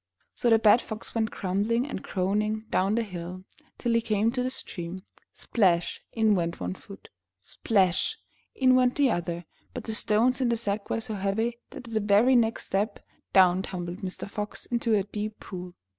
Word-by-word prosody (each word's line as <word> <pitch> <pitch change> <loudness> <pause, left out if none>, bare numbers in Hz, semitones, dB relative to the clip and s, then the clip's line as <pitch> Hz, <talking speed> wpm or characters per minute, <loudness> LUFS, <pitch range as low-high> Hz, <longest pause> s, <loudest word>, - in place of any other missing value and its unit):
'' - - -44
So 240 - 0
the 225 - +7
bad 220 +2 +5
Fox 220 0 -7
went 220 -1 0
grumbling 210 +6 0
and 275 -9 -5
groaning 210 +4 -1
down 195 +3 +2
the 235 - +1
hill, 185 -2 -7 0.3
till 240 - 0
he 230 - +3
came 220 0 +1
to 250 0 -1
the 255 - 0
stream. 185 -6 -5 0.3
Splash! 180 -7 +1
In 220 -2 +3
went 170 -3 -1
one 90 0 -3
foot. - - -13 0.3
Splash! 190 - +1 0.4
In 260 -1 +4
went 255 -1 +4
the 280 -4 +3
other, 175 -2 -3 0.3
but 250 - -4
the 220 - -4
stones 225 +5 +2
in 250 - +2
the 235 - +1
sack 205 -2 -3
were 225 - -1
so 220 -1 -2
heavy 215 +4 -1
that 245 - -10
at 230 - -9
the 220 - +2
very 210 +5 +4
next 230 -2 +2
step, 205 +2 -1 0.3
down 185 -1 +5
tumbled 180 -1 -5
Mr. 185 0 -5
Fox 210 +1 -5
into 235 -2 +1
a 200 - +2
deep 210 +2 -5
pool. 180 -1 -8
210 Hz, 190 wpm, -27 LUFS, 185-230 Hz, 0.4 s, the